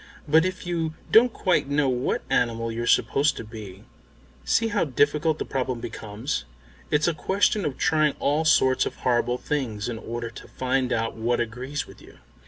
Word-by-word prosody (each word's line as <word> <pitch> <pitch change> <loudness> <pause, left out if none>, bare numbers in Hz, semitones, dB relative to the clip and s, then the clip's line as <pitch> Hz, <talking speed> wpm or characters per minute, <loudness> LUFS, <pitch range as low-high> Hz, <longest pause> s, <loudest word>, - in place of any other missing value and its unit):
But 160 +3 +5
if 185 0 -4
you 165 -2 -2 0.2
don't 240 +2 +7
quite 180 -9 +1
know 145 0 +2
what 125 0 -1
animal 115 -1 0
you're 120 +1 -3
supposed 145 +4 +3
to - - -5
be, 105 -3 -10 0.6
see 225 - +2
how - - +1
difficult 150 +3 +1
the - - -3
problem 130 -2 -2
becomes. 115 +2 -4 0.5
It's 150 +2 +2
a 170 - +2
question 195 +5 +1
of 140 -3 -2
trying 150 -1 +2
all 150 +3 +1
sorts 130 -4 +3
of - - -6
horrible 120 0 +1
things 125 -8 -3
in 115 -2 -4
order 115 +1 -5
to - - -11
find 130 0 -1
out 115 0 -1
what 120 +2 0
agrees 125 +5 -3
with - - -15
you." - - -16
130 Hz, 180 wpm, -25 LUFS, 115-155 Hz, 0.6 s, don't